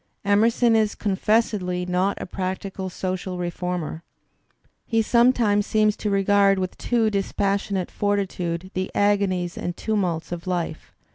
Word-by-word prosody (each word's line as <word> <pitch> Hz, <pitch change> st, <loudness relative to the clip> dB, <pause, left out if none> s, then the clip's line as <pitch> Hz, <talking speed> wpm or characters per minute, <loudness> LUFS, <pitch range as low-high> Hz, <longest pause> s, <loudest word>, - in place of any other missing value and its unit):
Emerson 225 Hz, +3 st, +3 dB
is 215 Hz, -1 st, +2 dB
confessedly 195 Hz, -3 st, 0 dB
not 180 Hz, +2 st, 0 dB
a -, -, -4 dB
practical 190 Hz, +1 st, -4 dB
social 185 Hz, 0 st, -4 dB
reformer; 175 Hz, -2 st, -3 dB, 0.9 s
he 225 Hz, -, +1 dB
sometimes 230 Hz, -3 st, +3 dB
seems 215 Hz, -1 st, +2 dB
to 210 Hz, -, -3 dB
regard 200 Hz, 0 st, +3 dB
with 185 Hz, -1 st, -2 dB
a -, -, -24 dB
too 230 Hz, -3 st, +1 dB
dispassionate 200 Hz, -1 st, -1 dB
fortitude 185 Hz, -3 st, -2 dB
the 185 Hz, 0 st, -2 dB
agonies 195 Hz, -4 st, +1 dB
and 175 Hz, -1 st, -4 dB
tumults 180 Hz, -8 st, -1 dB
of 175 Hz, +1 st, -6 dB
life. 170 Hz, -3 st, -3 dB
195 Hz, 130 wpm, -24 LUFS, 180-210 Hz, 0.9 s, Emerson